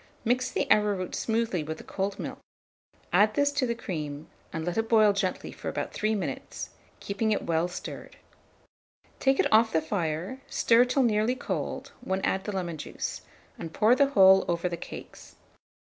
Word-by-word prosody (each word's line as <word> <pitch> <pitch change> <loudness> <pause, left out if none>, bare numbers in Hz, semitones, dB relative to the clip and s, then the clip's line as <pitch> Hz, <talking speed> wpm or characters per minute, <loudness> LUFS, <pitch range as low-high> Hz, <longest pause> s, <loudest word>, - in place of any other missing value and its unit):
Mix 250 +2 +1
the - - -1
arrowroot 205 -4 +2
smoothly 225 -6 0
with 160 +1 -5
the - - -11
cold 195 +1 -3
milk; - - -6 0.7
add 215 +1 +4
this 285 0 +3
to 285 -3 0
the 235 - -1
cream, 155 -9 -5 0.3
and 160 -1 -4
let 175 - -2
it 225 0 -1
boil 215 -3 +6
gently 195 -2 -2
for - - -6
about - - -4
3 215 +1 0
minutes, 160 -10 -5 0.3
keeping 210 +2 -1
it 210 - 0
well 165 +1 +1
stirred. 180 - -8 1.0
Take 270 0 +2
it - - +2
off 225 +1 +5
the 160 - +3
fire, 170 - -3
stir 235 +1 +4
till 260 +2 +2
nearly 220 +1 +2
cold, - - -4
when 190 0 -1
add 190 0 0
the 210 - -2
lemon 175 -5 -3
juice, - - -5 0.4
and 165 -1 -6
pour 220 +3 +4
the 280 +2 +4
whole 190 -6 +6
over 170 +1 0
the 175 - -3
cakes. - - -10
200 Hz, 180 wpm, -28 LUFS, 175-230 Hz, 1.0 s, boil